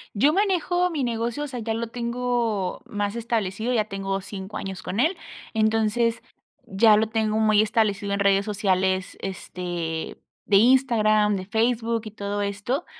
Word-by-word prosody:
Yo 275 Hz, +9 st, +4 dB
manejo 360 Hz, -1 st, +1 dB
mi 300 Hz, -5 st, -2 dB
negocio, 235 Hz, +3 st, -2 dB
o -, -, -3 dB
sea, 255 Hz, -3 st, -6 dB
ya 225 Hz, 0 st, -2 dB
lo 230 Hz, +1 st, -3 dB
tengo 235 Hz, -4 st, -2 dB
más 205 Hz, +1 st, -3 dB
establecido. 225 Hz, 0 st, -1 dB
Ya 215 Hz, -3 st, +2 dB
tengo 195 Hz, -1 st, -3 dB
5 195 Hz, +1 st, -7 dB
años 190 Hz, -2 st, -6 dB
con 200 Hz, -, -3 dB
él. 325 Hz, +9 st, +2 dB, 0.4 s
Entonces, 225 Hz, +1 st, +1 dB, 0.5 s
ya 210 Hz, +1 st, +5 dB
lo 220 Hz, +1 st, +2 dB
tengo 220 Hz, -1 st, 0 dB
muy 215 Hz, -1 st, +4 dB
establecido 205 Hz, -2 st, 0 dB
en 200 Hz, -, -1 dB
redes 200 Hz, 0 st, +3 dB
sociales, 190 Hz, -3 st, 0 dB
este, 175 Hz, -3 st, -5 dB, 0.3 s
de 200 Hz, -, +4 dB
Instagram, 215 Hz, -3 st, +4 dB
de 185 Hz, -, -4 dB
Facebook 230 Hz, +2 st, 0 dB
y 215 Hz, -, -7 dB
todo 205 Hz, -1 st, -3 dB
esto. 200 Hz, -, -2 dB
215 Hz, 155 wpm, -24 LUFS, 200-235 Hz, 0.5 s, ya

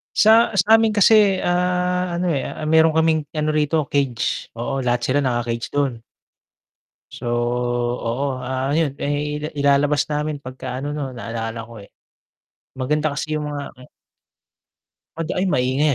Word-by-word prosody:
Sa 220 Hz, +1 st, +5 dB
sa'min 220 Hz, +3 st, +4 dB
kasi, 205 Hz, -2 st, +5 dB
ah, 180 Hz, 0 st, 0 dB
ano, 175 Hz, +1 st, 0 dB
eh, 140 Hz, -4 st, -1 dB
ah, -, -, -7 dB
meron 160 Hz, 0 st, +5 dB
kaming 160 Hz, -1 st, +2 dB
ano 155 Hz, 0 st, 0 dB
rito, 155 Hz, +1 st, +1 dB
cage. 135 Hz, -5 st, -1 dB
Oo, 130 Hz, +4 st, -3 dB
lahat 125 Hz, -2 st, 0 dB
sila 130 Hz, +4 st, +1 dB
naka-cage 120 Hz, -3 st, -2 dB
dun. 135 Hz, -5 st, -1 dB, 1.1 s
So, 120 Hz, -, -8 dB, 0.7 s
oo, 130 Hz, +3 st, -2 dB
ah, 130 Hz, +2 st, -2 dB
'yun, 150 Hz, -3 st, 0 dB
eh, 150 Hz, +1 st, -2 dB
ilalabas 140 Hz, +1 st, +2 dB
namin 150 Hz, -1 st, -2 dB
'pagka 130 Hz, -1 st, -6 dB
ano 145 Hz, +2 st, -4 dB
'no, 135 Hz, -3 st, -4 dB
naalala 115 Hz, -1 st, -5 dB
ko, 115 Hz, -2 st, -11 dB
eh. -, -, -20 dB, 0.9 s
Maganda 150 Hz, +4 st, 0 dB
kasi 155 Hz, +1 st, -3 dB
yung 150 Hz, -1 st, -3 dB
mga 145 Hz, -1 st, -6 dB
hmm. 125 Hz, -1 st, -16 dB, 1.3 s
'Pag 165 Hz, 0 st, -4 dB
ay, 185 Hz, -, +1 dB
maingay 135 Hz, -1 st, +1 dB
145 Hz, 145 wpm, -21 LUFS, 130-160 Hz, 1.3 s, Sa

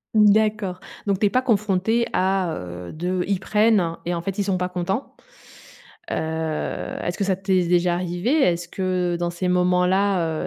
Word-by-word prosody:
Mmh, 215 Hz, -1 st, +6 dB
d'accord, 210 Hz, -3 st, +1 dB, 0.3 s
donc 195 Hz, -1 st, +1 dB
tu -, -, +2 dB
es 205 Hz, -, +4 dB
pas 255 Hz, +3 st, +2 dB
confrontée 220 Hz, -1 st, +1 dB
à, 185 Hz, -2 st, +1 dB
heu, 90 Hz, 0 st, -7 dB
de 180 Hz, +3 st, -1 dB
ils 195 Hz, -2 st, 0 dB
prennent 210 Hz, -4 st, +2 dB
et 175 Hz, -, -1 dB
en 170 Hz, -, -2 dB
fait 195 Hz, +3 st, -4 dB
ils 200 Hz, -, +1 dB
sont 190 Hz, -2 st, 0 dB
pas 180 Hz, 0 st, -2 dB
contents. 180 Hz, +7 st, -3 dB, 1.0 s
Heu, -, -, 0 dB, 0.9 s
est-ce 175 Hz, -, -3 dB
que 200 Hz, -, 0 dB
ça 190 Hz, -1 st, +1 dB
t'est 190 Hz, -1 st, +1 dB
déjà 175 Hz, 0 st, +3 dB
arrivé? 175 Hz, +6 st, -2 dB
Est-ce 175 Hz, 0 st, +1 dB
que, 185 Hz, -2 st, -1 dB
dans 175 Hz, 0 st, 0 dB
ces 180 Hz, +1 st, -3 dB
moments-là, 180 Hz, -1 st, +2 dB
185 Hz, 180 wpm, -23 LUFS, 175-200 Hz, 1.0 s, Mmh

